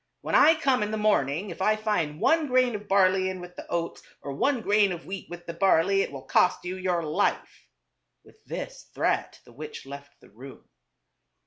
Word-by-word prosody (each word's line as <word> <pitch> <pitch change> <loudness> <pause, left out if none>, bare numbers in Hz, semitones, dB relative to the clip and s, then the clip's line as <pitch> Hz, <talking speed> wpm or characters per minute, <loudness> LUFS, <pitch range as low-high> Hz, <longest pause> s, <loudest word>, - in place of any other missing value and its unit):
When - - -5
I 320 - +7
come 270 -6 +1
in 210 - -1
the 220 - -2
morning, 195 -4 +1
if 170 - -9
I 215 +3 +3
find 190 -9 -2
one 320 -2 +3
grain 255 -2 +2
of 210 -1 -6
barley 190 -1 +3
in 185 -1 -5
with 180 0 -11
the - - -9
oats, 170 -1 -3 0.2
or 140 - -5
one 260 - 0
grain 205 -2 +3
of 170 -1 -6
wheat 195 -1 -7
with 175 0 -9
the 170 - -6
barley, 195 +1 +3
it - - -3
will 135 -2 -8
cost 180 - +2
you 180 +1 -3
your 180 -2 -1
life." 155 -1 -2 0.6
With - - -22
this - - -7
threat - - -1
the 120 - -17
witch 150 +3 -9
left 140 +1 -11
the - - -20
room. 130 +4 -13
185 Hz, 205 wpm, -26 LUFS, 165-210 Hz, 0.6 s, I